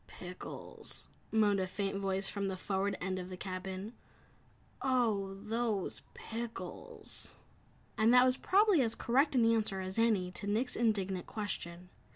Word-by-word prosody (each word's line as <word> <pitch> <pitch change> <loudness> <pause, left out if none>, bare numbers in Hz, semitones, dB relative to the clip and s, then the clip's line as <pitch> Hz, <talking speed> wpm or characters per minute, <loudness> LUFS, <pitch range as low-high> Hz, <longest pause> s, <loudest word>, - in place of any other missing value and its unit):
"Pickles!" 180 0 -7 0.2
moaned 210 -2 +4
a 185 - 0
faint 195 +1 -2
voice 195 0 0
from 200 -1 -2
the 190 -1 -2
forward 195 +1 0
end 185 0 -2
of 180 0 -6
the 185 - -6
cabin, 190 +3 -5 0.9
"Oh, 220 -7 +1
those 215 -1 -1
pickles!" 230 0 -5 0.6
And 220 +2 +6
that 250 0 +8
was 255 0 +4
probably 395 0 +4
as 230 -2 +1
correct 275 +4 +2
an 240 -3 +5
answer 215 -4 +1
as 190 +3 -3
any 210 -6 +3
to 200 - -4
Nick's 235 +5 +1
indignant 195 -5 +1
question. 180 -4 -4
205 Hz, 145 wpm, -34 LUFS, 190-230 Hz, 0.9 s, that